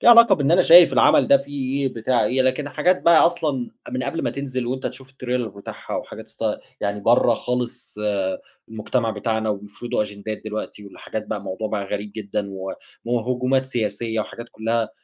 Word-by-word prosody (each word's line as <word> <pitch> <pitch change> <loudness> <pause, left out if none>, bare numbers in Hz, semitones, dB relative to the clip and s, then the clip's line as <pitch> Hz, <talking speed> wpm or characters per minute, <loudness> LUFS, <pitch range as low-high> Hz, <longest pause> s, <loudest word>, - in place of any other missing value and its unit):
في - - -1
علاقة 235 -3 +9
بإن 145 -4 0
أنا 180 +1 +6
شايف 170 +1 +8
العمل - - +5
ده 280 - +8
فيه 140 - -3
إيه 130 - -2
بتاع 120 +2 +1
إيه، 130 +1 +2
لكن 130 +3 0
الحاجات 175 +5 +1
بقى 170 -1 +6
أصلًا 150 -7 -1 0.2
من 125 +1 -2
قبل 140 +6 -3
ما - - 0
تنزل 130 -3 -4
وأنت 130 +2 -2
تشوف 130 +1 -8
التريلر 125 -3 -3
بتاعها، 100 0 -8
وحاجات - - -7
است - - -8 0.4
يعني 100 0 -2
برّا 120 +2 +4
خالص 125 -1 -4 0.7
المجتمع 110 +1 -1
بتاعنا، 110 -1 -1
وبيفرضوا 105 +3 -3
أجندات 105 +1 -6
دلوقتي 110 -1 -6
والحاجات 110 +2 -7
بقى 105 -1 -3
موضوع 105 +3 -4
بقى 105 -2 -2
غريب 100 +1 -5
جدًا، 100 -1 -3
و 95 0 -5 0.3
وهجومات 125 +2 0
سياسية 115 -2 -2
وحاجات 120 +2 -7
كلّها 115 0 -1
120 Hz, 175 wpm, -22 LUFS, 110-135 Hz, 0.7 s, علاقة